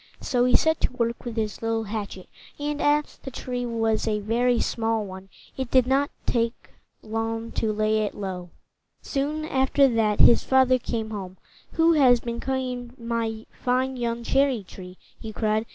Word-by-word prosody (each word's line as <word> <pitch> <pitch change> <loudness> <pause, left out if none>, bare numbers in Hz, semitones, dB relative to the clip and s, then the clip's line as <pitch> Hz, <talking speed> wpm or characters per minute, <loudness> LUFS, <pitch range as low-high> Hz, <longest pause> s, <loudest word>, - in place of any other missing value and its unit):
So 245 -2 +1
he 250 - +4
set 320 0 +3
to - - +1
work 235 0 -2
with 235 -2 -5
his 215 -2 -2
little 225 0 0
hatchet, 205 -3 -6 0.3
and, 295 0 -2
as 295 0 +1
the 265 - -7
tree 245 -1 -4
was 225 -1 0
a 215 -1 +1
very 235 +3 +1
small 225 -2 0
one, 190 0 -10 0.3
it 260 -2 -3
did 255 -1 +4
not 275 +2 +2 0.2
take 230 -1 -1 0.3
long 225 +1 -3
to 220 - -1
lay 215 +1 +1
it 210 -1 -2
low. 185 -3 -5 0.5
Soon 300 +2 -2
after 270 -1 +3
that, 220 -4 +1
his 235 - +7
father 260 -1 +4
came 225 -2 -3
home. 190 -3 -6 0.4
"Who 330 +1 +4
has 255 -6 +5
been 235 0 -5
cutting 250 -2 -3
my 230 -1 -3
fine 260 +1 -1
young 235 -1 -2
cherry 270 -3 +2
tree?" 180 0 -11 0.2
he 220 - -7
cried. 215 +1 0
235 Hz, 170 wpm, -25 LUFS, 220-260 Hz, 0.5 s, his